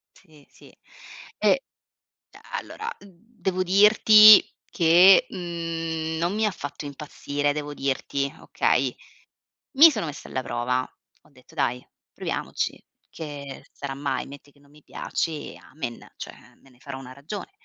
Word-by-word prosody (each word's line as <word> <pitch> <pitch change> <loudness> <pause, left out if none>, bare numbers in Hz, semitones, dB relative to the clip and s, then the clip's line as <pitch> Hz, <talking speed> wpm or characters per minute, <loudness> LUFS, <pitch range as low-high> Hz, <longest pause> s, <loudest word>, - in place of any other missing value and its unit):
Sì, 155 -6 -21
sì, - - -19 0.7
e - - +2 0.7
e - - -15 0.2
allora 450 - -8
devo 190 -1 -5
dirti 210 +2 +8 0.3
che, 175 +3 +6
mhmm, 165 -2 -4
non 170 +2 0
mi 220 +1 +1
ha - - +1
fatto 145 -2 -8
impazzire. 145 0 -3
Devo 145 0 -5
dirti, 140 0 -2
okay, - - 0 0.8
mi 315 +3 +8
sono 170 - -3
messa 145 - -8
alla 130 - -3
prova. 125 +1 -2 0.3
Ho - - -25
detto: 130 -3 -21
“Dai, 125 +1 -1 0.3
proviamoci, - - -4 0.3
che 145 -3 -9
sarà 140 -1 -6
mai. 140 -1 -3
Metti 145 +1 -13
che 145 - -27
non 140 0 -24
mi 150 +1 -20
piace, 155 -3 -4
amen.” 120 -6 -9
Cioè, - - -11
me 135 - -21
ne 125 - -24
farò 135 +1 -8
una 130 -1 -11
ragione. 155 - -8
150 Hz, 140 wpm, -24 LUFS, 140-185 Hz, 0.8 s, dirti